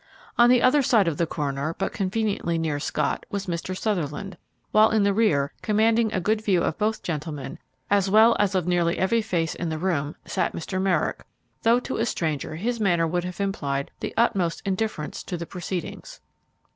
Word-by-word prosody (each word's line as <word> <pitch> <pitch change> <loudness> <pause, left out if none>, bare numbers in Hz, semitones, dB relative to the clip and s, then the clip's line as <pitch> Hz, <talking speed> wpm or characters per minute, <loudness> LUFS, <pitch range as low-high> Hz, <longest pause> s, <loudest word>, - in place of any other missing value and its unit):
On 240 0 +6
the 250 -1 +5
other 280 +3 +5
side 225 -7 +3
of 160 -3 0
the 170 - +1
coroner, 145 +1 -2
but 195 - -2
conveniently 195 -4 -1
near 155 -3 -1
Scott, - - -1
was 200 -1 -3
Mr. 180 +1 -3
Sutherland, 195 -1 -2 0.4
while 215 +1 +6
in 220 -2 +2
the 200 0 +3
rear, 150 -11 +2
commanding 220 +1 +2
a 190 - 0
good 215 +4 0
view 185 -5 +2
of - - -2
both 215 +1 0
gentlemen, 150 -4 -5 0.3
as 200 -1 +2
well 220 +3 +6
as 200 -1 +2
of 180 -3 +1
nearly 175 -1 +1
every 225 +5 +2
face 170 -7 -1
in 170 - -4
the 160 - -2
room, 155 -4 -1
sat - - -1
Mr. 185 +3 -3
Merrick, 190 -2 0 0.4
though 230 +2 +4
to 260 - -4
a 225 - +1
stranger 155 -5 -2
his 235 +8 -2
manner 175 -5 +2
would 175 +2 -1
have 180 +1 -6
implied 140 -9 -2
the - - -5
utmost 190 -7 +1
indifference 195 -5 -2
to 180 - -5
the 170 - -5
proceedings. 180 0 -6
185 Hz, 190 wpm, -25 LUFS, 165-215 Hz, 0.4 s, On